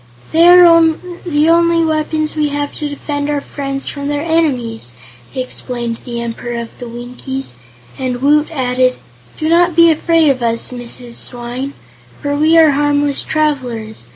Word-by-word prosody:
"They 335 Hz, +2 st, +5 dB
are 350 Hz, -2 st, +8 dB, 0.5 s
the 300 Hz, -1 st, +2 dB
only 335 Hz, 0 st, +3 dB
weapons 310 Hz, 0 st, -1 dB
we 305 Hz, -1 st, +1 dB
have 290 Hz, 0 st, -3 dB
to 295 Hz, -, -4 dB
defend 290 Hz, 0 st, -4 dB
our 295 Hz, -1 st, 0 dB
friends 275 Hz, -1 st, -4 dB
from 280 Hz, -1 st, -4 dB
their 290 Hz, 0 st, -1 dB
enemies," 255 Hz, -, -1 dB, 0.4 s
explained 245 Hz, -2 st, -4 dB
the 235 Hz, -1 st, -5 dB
Emperor 235 Hz, 0 st, -5 dB
of 230 Hz, -1 st, -8 dB
the 245 Hz, -, -7 dB
Winkies, 250 Hz, -, -6 dB, 0.5 s
and 255 Hz, -2 st, -2 dB
Woot 295 Hz, +3 st, +3 dB
added: 255 Hz, -4 st, +1 dB, 0.4 s
"Do 310 Hz, -, -2 dB
not 345 Hz, +1 st, +3 dB
be 335 Hz, 0 st, +6 dB
afraid 320 Hz, -1 st, +3 dB
of 255 Hz, -2 st, -3 dB
us, 230 Hz, 0 st, -1 dB
Mrs. 245 Hz, -1 st, -6 dB
Swyne, 245 Hz, +3 st, -4 dB, 0.5 s
for 285 Hz, -1 st, -2 dB
we 310 Hz, +3 st, +3 dB
are 320 Hz, -2 st, +6 dB
harmless 290 Hz, 0 st, +1 dB
travelers. 255 Hz, -8 st, -2 dB
285 Hz, 155 wpm, -15 LUFS, 245-310 Hz, 0.5 s, are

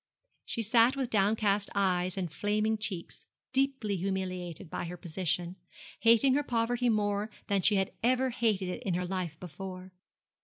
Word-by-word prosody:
She 230 Hz, -, -2 dB
sat 230 Hz, +4 st, +5 dB
with 265 Hz, -3 st, -2 dB
downcast 205 Hz, 0 st, +2 dB
eyes 185 Hz, -2 st, +1 dB
and 180 Hz, -4 st, -2 dB
flaming 215 Hz, +1 st, +1 dB
cheeks, 190 Hz, -5 st, -3 dB, 0.3 s
deeply 265 Hz, -7 st, +1 dB
humiliated 185 Hz, -2 st, -3 dB
by 160 Hz, -, -4 dB
her 175 Hz, +1 st, -6 dB
position, 175 Hz, +1 st, -2 dB, 0.4 s
hating 230 Hz, +4 st, +5 dB
her 290 Hz, -, +3 dB
poverty 245 Hz, -1 st, 0 dB
more 205 Hz, -1 st, +1 dB, 0.2 s
than 200 Hz, -1 st, +2 dB
she 205 Hz, +3 st, +4 dB
had 195 Hz, 0 st, +1 dB
ever 255 Hz, +2 st, +2 dB
hated 215 Hz, -5 st, 0 dB
it 180 Hz, -, -4 dB
in 195 Hz, -8 st, -1 dB
her 180 Hz, 0 st, -1 dB
life 175 Hz, -4 st, -3 dB
before. 185 Hz, +2 st, -8 dB
200 Hz, 155 wpm, -30 LUFS, 185-230 Hz, 0.4 s, sat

